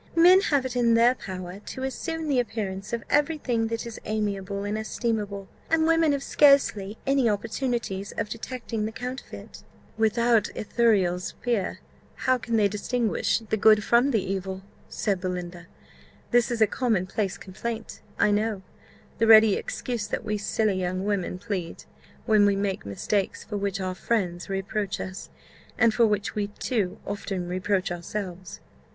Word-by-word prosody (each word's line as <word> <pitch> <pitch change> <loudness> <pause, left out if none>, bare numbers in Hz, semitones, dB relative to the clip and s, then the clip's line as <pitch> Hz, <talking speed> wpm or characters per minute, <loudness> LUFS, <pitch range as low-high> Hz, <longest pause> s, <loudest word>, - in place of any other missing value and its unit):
Men 360 +3 +7
have 285 -8 +1
it 255 -1 -4
in 235 -2 +4
their 235 +2 +5
power 185 -5 -7
to 260 +5 -7
assume 320 +4 -3
the 275 -4 +2
appearance 210 -4 -3
of 235 -1 -2
every 295 +2 +2
thing 235 -5 0
that 230 +1 -3
is 230 -1 -8
amiable 200 -2 -2
and 205 +1 -2
estimable, 215 -3 -2 0.2
and 320 0 +3
women 330 -1 +4
have 280 -1 -1
scarcely 225 -10 +4
any 270 -3 +3
opportunities 220 -2 -2
of 225 - -2
detecting 230 0 -4
the 220 - -3
counterfeit." 250 +3 -8 0.4
"Without 225 0 +3
Ithuriel's 200 -6 +1
spear, 230 -6 -2 0.3
how 255 -1 +1
can 230 0 -2
they 210 -2 +4
distinguish 220 +1 0
the 220 - +2
good 215 0 +5
from 240 +5 +4
the 220 -8 +1
evil?" 190 0 -4 0.3
said 195 -3 -1
Belinda. 180 -2 -5 0.6
"This 240 -2 +4
is 235 -2 -2
a - - +8
common 215 -4 0
place 195 0 -2
complaint, 225 +4 -6 0.2
I 210 - +3
know; 210 -1 0 0.6
the 225 - +3
ready 220 -1 +8
excuse 235 0 -3
that - - -3
we 215 0 -1
silly 205 -1 0
young 185 +1 -2
women 200 -3 -1
plead, 185 -4 -5 0.4
when 210 -2 +5
we 200 - +3
make 195 - -2
mistakes 190 - -1
for 210 - -6
which 200 -1 -2
our 185 -1 -2
friends 180 -3 -2
reproach 195 +1 -2
us, 190 +1 -6 0.5
and 230 -2 +4
for 235 0 +4
which 205 -1 -1
we 205 -1 -1
too 205 -2 -2
often 195 -3 -4
reproach 185 +1 -1
ourselves." 180 +1 -6
215 Hz, 160 wpm, -26 LUFS, 195-235 Hz, 0.6 s, a